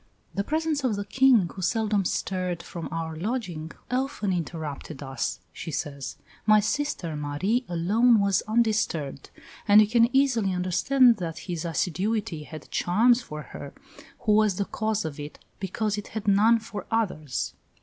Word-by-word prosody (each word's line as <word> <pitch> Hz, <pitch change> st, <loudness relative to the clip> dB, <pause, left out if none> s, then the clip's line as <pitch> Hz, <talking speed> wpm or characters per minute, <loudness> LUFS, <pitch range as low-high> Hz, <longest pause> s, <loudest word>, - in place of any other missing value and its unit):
"The 200 Hz, -, -1 dB
presence 310 Hz, +2 st, -1 dB
of 245 Hz, -5 st, +1 dB
the 200 Hz, 0 st, -4 dB
King, 250 Hz, -4 st, +4 dB
who 190 Hz, -, -7 dB
seldom 210 Hz, 0 st, +1 dB
stirred 180 Hz, -2 st, -2 dB
from 170 Hz, -2 st, -6 dB
our 165 Hz, -1 st, -3 dB
lodging, 175 Hz, -5 st, -3 dB, 0.2 s
often 255 Hz, -6 st, -1 dB
interrupted 155 Hz, -4 st, -5 dB
us," 135 Hz, -2 st, -3 dB
she -, -, -7 dB
says; 140 Hz, -4 st, -4 dB, 0.3 s
"my 215 Hz, 0 st, +7 dB
sister, 210 Hz, -, -1 dB
Marie, 150 Hz, -, -1 dB
alone 210 Hz, +8 st, +4 dB
was 200 Hz, -2 st, +2 dB
undisturbed; 215 Hz, -11 st, 0 dB, 0.4 s
and 205 Hz, 0 st, +8 dB
you 215 Hz, -, +7 dB
can 230 Hz, +2 st, +4 dB
easily 235 Hz, -8 st, +2 dB
understand 230 Hz, +8 st, +4 dB
that 165 Hz, -4 st, -4 dB
his 175 Hz, -3 st, -4 dB
assiduity 180 Hz, 0 st, -1 dB
had 155 Hz, 0 st, -10 dB
charms 235 Hz, +7 st, +3 dB
for 150 Hz, -9 st, -7 dB
her, -, -, -8 dB, 0.5 s
who 215 Hz, -, +1 dB
was 210 Hz, -2 st, +4 dB
the 200 Hz, -, -1 dB
cause 220 Hz, 0 st, -1 dB
of 155 Hz, -2 st, -5 dB
it, 145 Hz, +1 st, -7 dB, 0.2 s
because 205 Hz, +2 st, -1 dB
it 205 Hz, -, -8 dB
had 215 Hz, -2 st, -6 dB
none 210 Hz, +4 st, +5 dB
for 220 Hz, -3 st, -7 dB
others." 170 Hz, -, -1 dB
200 Hz, 155 wpm, -26 LUFS, 165-225 Hz, 0.5 s, and